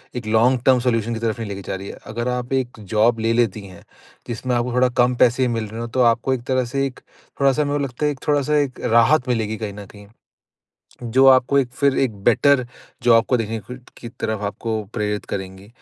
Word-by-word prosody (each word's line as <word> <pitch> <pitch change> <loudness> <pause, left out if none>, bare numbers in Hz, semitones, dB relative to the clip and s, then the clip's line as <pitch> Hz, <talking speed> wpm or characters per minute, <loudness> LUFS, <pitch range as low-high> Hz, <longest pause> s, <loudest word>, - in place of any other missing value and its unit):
एक 120 -2 -5
long 120 +3 +3
term 130 -1 +5
solution 120 -2 0
की 115 - -4
तरफ 115 0 -2
नहीं 110 -2 -5
लेके 100 -1 -6
जा - - -2
रही 95 +1 -8
है। - - -8
अगर 120 +2 -4
आप 125 +1 -3
एक 125 -3 -2
जॉब 110 +3 +1
ले 115 +1 +1
लेती 115 -3 0
हैं, 90 -2 -14 0.4
जिसमें 125 +1 -2
आपको 120 +1 -1
थोड़ा 125 0 +3
कम 125 +1 +1
पैसे 125 +2 +3
ही - - +2
मिल 115 -2 -2
रहे 110 +2 -8
हों, 115 - -4
तो 130 +2 0
आपको 120 +2 +2
एक 125 -2 -4
तरह 130 -1 +1
से 135 +3 -1
एक 130 - -11 0.4
थोड़ा-सा 140 +2 +3
मेरे 145 0 -1
को 145 - -1
लगता 135 +2 -3
है, 150 -1 0
थोड़ा-सा 145 0 +1
एक 140 -3 -1
राहत 125 +4 +3
मिलेगी 110 -3 -1
कहीं 105 -2 -5
न 100 0 -9
कहीं। 100 +1 -15 1.0
जो 125 +3 +3
आपको 130 +1 +5
एक 135 - 0
फिर 140 -2 +2
एक 130 -3 +1
बेटर 125 +3 +3 0.4
जॉब 115 -2 +5
को 125 - +3
देखने 115 0 -3
कु 125 - -10 0.2
की 120 - -9
तरफ 110 -2 -4
आपको 110 +2 -3
प्रेरित 105 -2 -2
करेंगी। 95 0 -6
120 Hz, 230 wpm, -21 LUFS, 110-130 Hz, 1.0 s, term